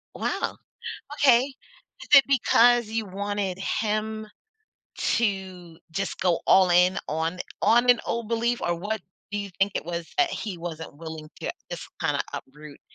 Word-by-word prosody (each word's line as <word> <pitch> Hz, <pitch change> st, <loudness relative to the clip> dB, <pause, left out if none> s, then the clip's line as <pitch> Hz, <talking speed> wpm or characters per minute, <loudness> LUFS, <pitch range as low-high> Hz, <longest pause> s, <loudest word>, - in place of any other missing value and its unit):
Wow! -, -, -2 dB, 0.6 s
Okay. 265 Hz, -5 st, +6 dB, 0.6 s
Is -, -, -10 dB
it 275 Hz, -, +10 dB
because 240 Hz, -3 st, +4 dB
you 220 Hz, 0 st, -2 dB
wanted 200 Hz, -1 st, -3 dB
him 215 Hz, +2 st, -2 dB, 0.7 s
to 190 Hz, -6 st, -1 dB
just 195 Hz, +3 st, -3 dB
go 175 Hz, -3 st, +2 dB
all 185 Hz, -2 st, +6 dB
in 180 Hz, +2 st, +4 dB
on 160 Hz, +3 st, -1 dB, 0.2 s
on 240 Hz, +2 st, +5 dB
an 245 Hz, -, +4 dB
old 230 Hz, -2 st, -2 dB
belief 235 Hz, +1 st, 0 dB
or 175 Hz, -, +1 dB
what 205 Hz, +5 st, -3 dB, 0.3 s
do 205 Hz, -, -2 dB
you 200 Hz, -1 st, -5 dB
think 195 Hz, +1 st, +3 dB
it -, -, -2 dB
was 170 Hz, -1 st, -4 dB
that 355 Hz, -2 st, +3 dB
he 200 Hz, -5 st, -4 dB
wasn't 165 Hz, -3 st, -7 dB
willing 160 Hz, -1 st, -8 dB
to -, -, -2 dB, 0.2 s
just -, -, -6 dB
kinda -, -, +1 dB
uproot, 150 Hz, +1 st, -9 dB
195 Hz, 155 wpm, -26 LUFS, 175-225 Hz, 0.7 s, it